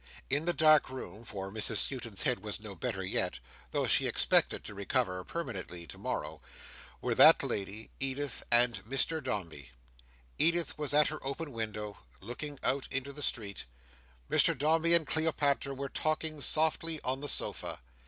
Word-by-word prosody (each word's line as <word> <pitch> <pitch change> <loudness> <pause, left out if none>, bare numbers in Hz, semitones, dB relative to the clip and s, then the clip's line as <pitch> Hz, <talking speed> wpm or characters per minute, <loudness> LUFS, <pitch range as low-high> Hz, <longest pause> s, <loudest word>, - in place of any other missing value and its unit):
In 145 +3 +1
the 175 - +2
dark 155 -2 +5
room—for 105 -5 -7
Mrs 110 +1 -1
Skewton's 115 -6 0
head - - +2
was 105 +1 -4
no 105 -2 -8
better 95 -2 -4
yet, - - -1 0.3
though - - -1
she - - +3
expected - - +3
to - - -8
recover 95 -2 -1
permanently 95 - -6
to - - -9
morrow—were 75 +1 -6
that - - +8
lady, 100 +2 -4
Edith, 135 0 -2
and 120 0 +4
Mr 135 +7 0
Dombey. 85 - -5 0.7
Edith 170 -1 +2
was 150 -1 +1
at 150 0 +5
her 155 - -7
open 140 +3 -4
window 105 -3 -5 0.2
looking 140 +8 -6
out 135 0 0
into 135 +1 -3
the 145 - -8
street; 105 -7 -2 0.6
Mr - - +4
Dombey 160 +4 +4
and 165 -2 +3
Cleopatra 145 -3 +1
were 140 +1 -4
talking 155 +1 -1
softly 160 +3 +2
on 130 +2 -2
the 145 - -2
sofa. - - -1
130 Hz, 155 wpm, -31 LUFS, 105-150 Hz, 0.7 s, that